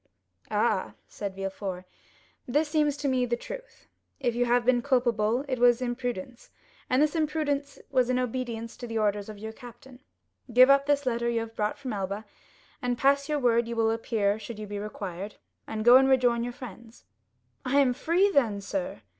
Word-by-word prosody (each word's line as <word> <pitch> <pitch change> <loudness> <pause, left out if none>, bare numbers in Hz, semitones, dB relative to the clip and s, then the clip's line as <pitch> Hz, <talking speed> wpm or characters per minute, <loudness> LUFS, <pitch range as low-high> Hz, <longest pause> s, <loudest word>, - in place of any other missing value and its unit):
"Ah," - - 0
said 200 -2 -6
Villefort, 195 -1 -5 0.6
"this 295 +5 +1
seems 300 -2 +1
to 285 0 -2
me 260 -2 +2
the 240 -1 0
truth. - - -10 0.3
If 245 -4 0
you 245 +1 +1
have 240 0 +2
been 245 -1 +3
culpable, 240 -1 +1
it 255 -2 -2
was 240 0 +5
imprudence, 245 -2 -4 0.4
and 255 - +3
this 300 +2 +2
imprudence 300 -3 -1
was 255 -1 +2
in 255 - +2
obedience 240 -2 -3
to 245 - -7
the 225 -1 -3
orders 205 -1 0
of 215 - -8
your 220 +2 -6
captain. 245 +1 -13 0.5
Give 255 +3 +7
up 275 0 +4
this 285 -1 +2
letter 235 -1 0
you 230 -1 0
have 225 0 -8
brought 210 0 -1
from 260 -4 -5
Elba, 200 +2 -3 0.6
and 245 -1 -1
pass 280 +2 +2
your 300 - +1
word 235 -3 +2
you 235 - -4
will 225 -1 +2
appear 220 -2 0
should 220 +1 -8
you 215 - -6
be 205 0 -5
required, 200 -1 -6 0.3
and 215 0 -4
go 245 +1 +9
and 265 0 +4
rejoin 245 -3 +3
your 245 0 -4
friends. 235 -1 -11 0.6
"I 270 +2 +1
am 260 -3 +4
free, 345 +9 +2
then, 230 - +2
sir?" 195 - -4
240 Hz, 190 wpm, -27 LUFS, 220-265 Hz, 0.6 s, go